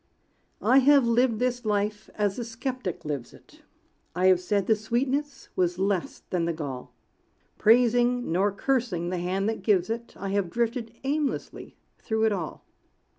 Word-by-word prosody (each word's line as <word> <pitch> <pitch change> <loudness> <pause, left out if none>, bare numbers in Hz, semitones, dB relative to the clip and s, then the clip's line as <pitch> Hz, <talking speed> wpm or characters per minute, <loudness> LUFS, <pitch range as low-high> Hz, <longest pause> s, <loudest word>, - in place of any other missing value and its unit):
I 265 - +6
have 275 -1 +5
lived 235 0 +2
this 245 +1 -1
life 210 0 -1
as 205 -2 0
the 240 - -2
skeptic 235 - -5
lives 140 -5 -4
it; - - -20 0.5
I 180 +1 +1
have 185 -1 +5
said 200 +2 0
the 220 - +4
sweetness 260 +7 -2
was 180 -1 +1
less 190 -2 -1
than 175 -2 +1
the 170 - 0
gall; 140 -5 -6 0.6
Praising, 245 0 +3
nor 195 +4 +2
cursing, 200 -6 -1
the 180 - -2
Hand 190 +3 -1
that 225 -2 -2
gives 190 0 +2
it, 235 +1 -5
I 195 - -4
have 195 -2 0
drifted 235 +1 -2
aimlessly 285 +1 -3 0.2
through 220 -1 -1
it 220 - +3
all. 180 -6 -4
215 Hz, 160 wpm, -26 LUFS, 185-245 Hz, 0.6 s, I